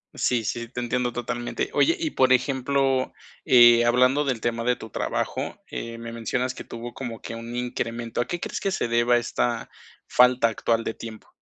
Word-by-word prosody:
Sí, 120 Hz, -3 st, +1 dB
sí, 120 Hz, +2 st, -3 dB
te 125 Hz, -, -6 dB
entiendo 125 Hz, 0 st, -1 dB
totalmente. 120 Hz, -, -3 dB
Oye, 335 Hz, -7 st, +3 dB
y 320 Hz, -2 st, -1 dB
por 130 Hz, 0 st, +4 dB
ejemplo, 135 Hz, 0 st, +1 dB, 0.3 s
eh, 120 Hz, -4 st, +7 dB
hablando 130 Hz, +4 st, +3 dB
del 125 Hz, -5 st, -1 dB
tema 115 Hz, 0 st, -1 dB
de 125 Hz, +1 st, +2 dB
tu 110 Hz, -, -10 dB
trabajo, -, -, -3 dB
eh, 115 Hz, 0 st, -6 dB
me 115 Hz, 0 st, -7 dB
mencionas 125 Hz, +2 st, -2 dB
que -, -, -7 dB
tuvo 120 Hz, +1 st, -8 dB
como 120 Hz, -4 st, -6 dB
que 115 Hz, -, -6 dB
un 115 Hz, +1 st, -7 dB
incremento, 120 Hz, -1 st, -3 dB
¿a 120 Hz, -, +2 dB
qué 175 Hz, +5 st, -4 dB
crees -, -, -4 dB
que 195 Hz, -, -1 dB
se 155 Hz, -, -1 dB
deba 120 Hz, +1 st, +3 dB
esta 120 Hz, 0 st, -1 dB, 0.4 s
falta 125 Hz, -1 st, +5 dB
actual 115 Hz, +1 st, 0 dB
de 115 Hz, -, -4 dB
tiempo? 110 Hz, -2 st, -10 dB
120 Hz, 190 wpm, -25 LUFS, 115-130 Hz, 0.4 s, eh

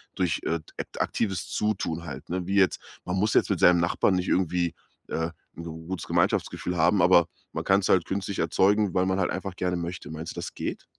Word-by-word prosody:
durch, 90 Hz, -4 st, 0 dB
äh, 85 Hz, +1 st, 0 dB
d 80 Hz, -, -19 dB
äk -, -, -4 dB
aktives 95 Hz, -4 st, -1 dB
Zutun 85 Hz, -6 st, -1 dB
halt, 70 Hz, -3 st, -8 dB
ne? 90 Hz, 0 st, -2 dB
Wie 95 Hz, +2 st, -1 dB
jetzt, 95 Hz, -2 st, +3 dB, 0.3 s
man 90 Hz, -, -2 dB
muss 105 Hz, +3 st, +1 dB
jetzt -, -, +3 dB
mit -, -, 0 dB
seinem 90 Hz, -1 st, +6 dB
Nachbarn 85 Hz, +2 st, +2 dB
nicht 90 Hz, 0 st, -1 dB
irgendwie, 90 Hz, -2 st, +1 dB, 0.3 s
äh, 80 Hz, 0 st, -2 dB, 0.3 s
'n 85 Hz, -, -6 dB, 0.2 s
gutes 95 Hz, -1 st, -4 dB
Gemeinschaftsgefühl 90 Hz, -, 0 dB
haben, 90 Hz, +5 st, +4 dB
aber 85 Hz, -2 st, +6 dB, 0.3 s
man -, -, -3 dB
kann's 95 Hz, 0 st, +3 dB
halt 90 Hz, -3 st, +5 dB
künstlich 100 Hz, 0 st, -3 dB
erzeugen, 95 Hz, +4 st, +2 dB
weil 90 Hz, 0 st, +2 dB
man 95 Hz, 0 st, +1 dB
halt 95 Hz, -, +1 dB
einfach 95 Hz, 0 st, -4 dB
gerne 90 Hz, -1 st, -1 dB
möchte. 85 Hz, -1 st, -5 dB
Meinst 80 Hz, +1 st, -6 dB
du, -, -, -19 dB
das -, -, -5 dB
geht? -, -, -5 dB
90 Hz, 215 wpm, -26 LUFS, 85-95 Hz, 0.3 s, seinem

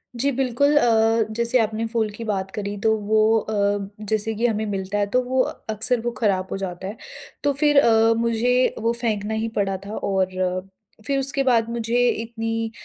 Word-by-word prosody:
जी 275 Hz, +4 st, +1 dB
बिल्कुल 270 Hz, +3 st, +1 dB
अ, 225 Hz, -3 st, +3 dB
जैसे 235 Hz, +2 st, +2 dB
आपने 220 Hz, 0 st, 0 dB
फूल 225 Hz, -2 st, -1 dB
की 230 Hz, +3 st, -8 dB
बात 195 Hz, -3 st, -2 dB
करी 205 Hz, -1 st, -3 dB
तो 220 Hz, 0 st, +3 dB
वो 215 Hz, +1 st, +3 dB
अ, 205 Hz, -1 st, 0 dB, 0.3 s
जैसे 220 Hz, 0 st, 0 dB
कि 230 Hz, +3 st, 0 dB
हमें 220 Hz, -1 st, -1 dB
मिलता 195 Hz, -1 st, -3 dB
है 205 Hz, -, +2 dB
तो 255 Hz, -, +5 dB
वो 255 Hz, +1 st, +1 dB, 0.3 s
अक्सर 220 Hz, +3 st, +1 dB
वो 240 Hz, +1 st, -2 dB
खराब 190 Hz, -4 st, +1 dB
हो -, -, -2 dB
जाता 190 Hz, -1 st, -5 dB
है। 210 Hz, -, -7 dB, 0.5 s
तो 285 Hz, -, +2 dB
फिर 290 Hz, 0 st, +4 dB
अ, 225 Hz, -2 st, +4 dB
मुझे 235 Hz, +2 st, +2 dB
वो 230 Hz, +1 st, +1 dB
फेंकना 215 Hz, -2 st, -1 dB
ही 220 Hz, +1 st, -1 dB
पड़ा 195 Hz, -1 st, 0 dB
था 210 Hz, +2 st, -6 dB
और 185 Hz, -1 st, -1 dB, 0.4 s
फिर 275 Hz, -1 st, 0 dB
उसके 275 Hz, 0 st, 0 dB
बाद 230 Hz, -3 st, +2 dB
मुझे 235 Hz, +1 st, +1 dB
इतनी 225 Hz, 0 st, -3 dB
225 Hz, 185 wpm, -23 LUFS, 205-235 Hz, 0.5 s, तो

